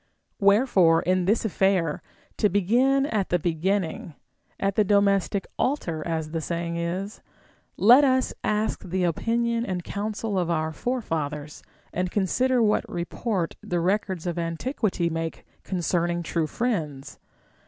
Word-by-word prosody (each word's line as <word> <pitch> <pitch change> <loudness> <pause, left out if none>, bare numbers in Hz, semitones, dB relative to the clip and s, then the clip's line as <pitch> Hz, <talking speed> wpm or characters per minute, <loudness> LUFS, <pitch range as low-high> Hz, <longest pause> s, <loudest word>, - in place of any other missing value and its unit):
AVherefore, 200 -5 +4
in 185 0 +1
this 215 +4 +2
affair, 190 -6 +1 0.2
— - - -34
to 210 - +4
begin 245 +9 +3
at 210 -8 -1
the 175 - +3
beginning 170 -1 -1 0.4
(at 195 0 0
the 215 - +4
domestic 200 -1 +2
altar, 180 - -1
as 160 -2 -2
the 165 0 -2
saying 170 +1 -3
is), 180 +5 -3 0.3
— - - -32 0.2
let 245 +8 +7
us 260 -2 +2
ask 215 +1 0
the 185 0 -2
opinion 230 +7 0
and 185 -5 -3
counsel 205 0 -3
of 175 -2 -1
our 160 -1 0
forefathers, 155 - -3 0.3
and 180 +1 -1
consider 240 +6 +1
what 210 -1 +1
report 175 +1 -2
the 175 - -2
records 185 -1 -1
of 175 -1 -2
antiquity 175 - -1
make 165 0 -4 0.2
concerning 175 -1 -1
true 165 -1 -1
friends. 155 - -3
185 Hz, 140 wpm, -25 LUFS, 170-215 Hz, 0.4 s, let